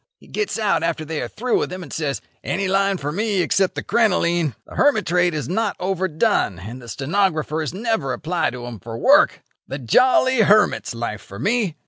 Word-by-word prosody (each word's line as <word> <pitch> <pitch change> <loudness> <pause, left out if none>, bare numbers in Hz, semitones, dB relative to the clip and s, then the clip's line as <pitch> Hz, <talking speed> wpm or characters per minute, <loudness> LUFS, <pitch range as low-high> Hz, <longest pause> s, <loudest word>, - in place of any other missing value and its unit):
He - - -20
gets 420 - -3
out 210 -6 +1
after 165 -1 -2
they 155 0 -3
are 120 - -3
through 245 - -1
with - - -2
him, 185 0 -6
and 145 - -10
says: 145 -4 -2 0.2
'Any 195 +2 -1
line 195 0 +2
for 145 -2 -4
me 205 +2 0
except 190 +2 +1
the - - -4
crinoline. 175 - +1
The - - -14
hermit 275 -8 +2
trade 175 -1 +2
is 145 -5 -3
not 210 +5 -1
overdone, 185 - 0
and 110 +8 -9
the 120 - -11
stenographers 155 - -1
never 205 - -1
apply 165 +6 -1
to 120 -1 -7
'em 120 -3 -8
for 115 +4 -7
work. - - +4 0.2
The 135 - -4
jolly 255 - +3
hermit's 210 - +3
life 115 -3 -4
for 100 - -11
me. 210 - 0
175 Hz, 195 wpm, -21 LUFS, 140-205 Hz, 0.2 s, work